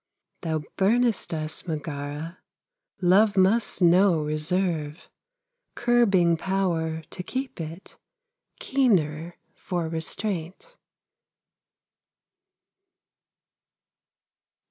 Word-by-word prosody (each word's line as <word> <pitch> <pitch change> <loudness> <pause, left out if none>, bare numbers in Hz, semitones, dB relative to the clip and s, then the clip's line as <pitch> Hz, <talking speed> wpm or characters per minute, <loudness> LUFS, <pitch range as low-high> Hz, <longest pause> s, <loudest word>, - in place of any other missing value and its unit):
Thou 160 -3 -2
burnest 225 +2 +2
us, 155 +1 -3
Megara, 150 +1 -5 0.6
Love 200 +3 +4
must 195 +1 +3
know 175 0 +5
reserve, 155 0 -2 0.6
Curbing 200 -9 +3
power 165 -4 -1
to - - -6
keep 260 +1 -5
it 165 +4 -8 0.6
Keener 175 - +1 0.2
for 175 -3 -3
restraint. 180 - -4
175 Hz, 65 wpm, -25 LUFS, 160-200 Hz, 0.6 s, know